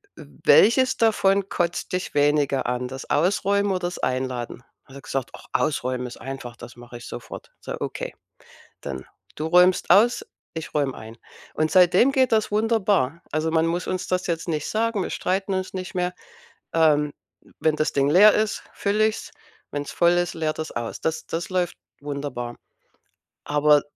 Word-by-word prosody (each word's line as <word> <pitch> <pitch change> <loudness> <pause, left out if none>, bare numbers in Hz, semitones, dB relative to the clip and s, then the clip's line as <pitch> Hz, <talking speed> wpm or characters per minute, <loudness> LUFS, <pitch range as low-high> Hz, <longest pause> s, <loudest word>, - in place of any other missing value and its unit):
w - - -11 0.2
welches 255 +4 +5
davon 200 -3 +2
kotzt 175 -1 -2
dich 180 - -2
weniger 145 -1 +2
an? 125 0 -1
Das 135 +1 -7
Ausräumen 200 +5 +2
oder 185 - 0
das 175 0 -3
Einladen?“ 125 -1 -3 0.2
Hat 135 - -15
er 140 - -9
gesagt: 135 -1 -4
„Och, - - -14
Ausräumen 125 -3 0
ist 120 - -10
einfach, 135 -2 -7
das 120 - -11
mache 120 0 -10
ich 120 - -11
sofort.“ - - -9
So, - - -5
okay, - - -4 0.7
dann: 65 -2 -6 0.3
„Du 155 - -3
räumst 180 +2 +4
aus, 235 +5 +5 0.3
ich 160 -4 -6
räume 140 -3 0
ein.“ 110 +1 -10 0.4
Und 155 0 0
seitdem 185 +7 +5
geht 260 -2 +2
das 220 -2 +2
wunderbar. 205 - +1
Also, 155 +2 0
man 160 0 +3
muss 170 +2 -2
uns 185 0 -2
das 185 0 -1
jetzt 165 0 -2
nicht 155 -3 -2
sagen, 225 -1 0
wir - - -4
streiten 195 +2 -1
uns 185 0 -3
nicht 185 +1 -6
mehr, 180 0 0 0.6
ähm, 150 -3 +3 0.5
wenn 155 -1 +2
das 155 0 0
Ding 140 -1 +2
leer 205 +7 +7
ist, 215 +1 0
fülle 210 +2 +2
ich's. 220 - -5 0.4
Wenn's 145 0 -4
voll 170 0 +3
ist, 175 0 0
leert 160 -1 -2
er's 155 - -4
aus. 120 -1 -5
Das 160 0 -2
das 165 +1 -4
läuft 180 -2 -1 0.3
wunderbar, 140 -4 -5 0.9
aber 150 0 +4
165 Hz, 175 wpm, -24 LUFS, 140-190 Hz, 0.9 s, leer